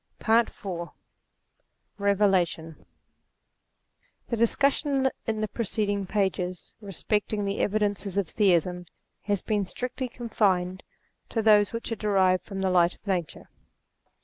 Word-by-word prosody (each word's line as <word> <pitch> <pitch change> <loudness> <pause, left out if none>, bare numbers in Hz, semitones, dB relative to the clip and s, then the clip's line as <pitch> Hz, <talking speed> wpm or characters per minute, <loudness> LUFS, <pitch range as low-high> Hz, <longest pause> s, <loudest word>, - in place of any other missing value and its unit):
PAET 225 +1 +3
IY 175 -3 -6
i - - -22 1.1
BEVELATION 185 -6 +1 1.4
discussion 265 +3 +2 0.2
in 220 -1 -1
the 215 - 0
preceding 205 -3 -2
pages 185 -3 -2
respecting 205 +1 -1
the 200 0 -2
evidences 205 -2 -1
of 200 -4 +1
Theism 180 -3 +1 0.4
has 205 -2 0
been 210 -2 0
strictly 250 +6 -4
con 240 0 -8
fined 185 -4 +1 0.5
to 225 - -1
those 210 -2 +5
which 230 0 -5
are - - 0
derived 190 -4 +2
from 195 -1 -5
the 190 -1 +1
light 175 -1 +3
of - - -31
Nature. 180 -6 -3
200 Hz, 120 wpm, -27 LUFS, 185-220 Hz, 1.4 s, those